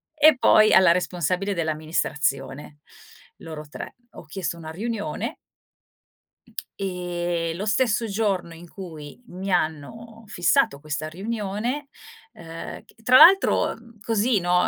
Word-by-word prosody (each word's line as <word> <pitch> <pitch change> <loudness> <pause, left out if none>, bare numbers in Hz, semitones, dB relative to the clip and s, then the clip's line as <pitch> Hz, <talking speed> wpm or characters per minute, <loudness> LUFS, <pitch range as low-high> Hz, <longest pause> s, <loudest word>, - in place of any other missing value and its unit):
e 305 -2 +6
poi 215 0 +5
alla 190 -2 +7
responsabile 180 +2 -1
dell'amministrazione, 150 -3 -2 0.6
loro 155 -2 -8
3. - - -8 0.2
Ho - - -12
chiesto 170 0 -4
una 160 -1 -8
riunione 215 +4 -4 1.4
e 175 -3 -2
lo 200 +4 -4
stesso 225 0 +1
giorno 195 -5 -1
in 170 +1 -13
cui 160 0 -10
mi 190 +2 -6
hanno 180 +8 -3
fissato 175 -7 +1
questa 155 0 -4
riunione, 215 - -4 0.4
uhm, 165 0 -9
c - - -23
tra 255 +3 +6
l'altro, 375 +5 +6
mhmm, 230 -2 -19
così, 225 0 +1
no, 180 0 +2
180 Hz, 120 wpm, -24 LUFS, 165-220 Hz, 1.4 s, alla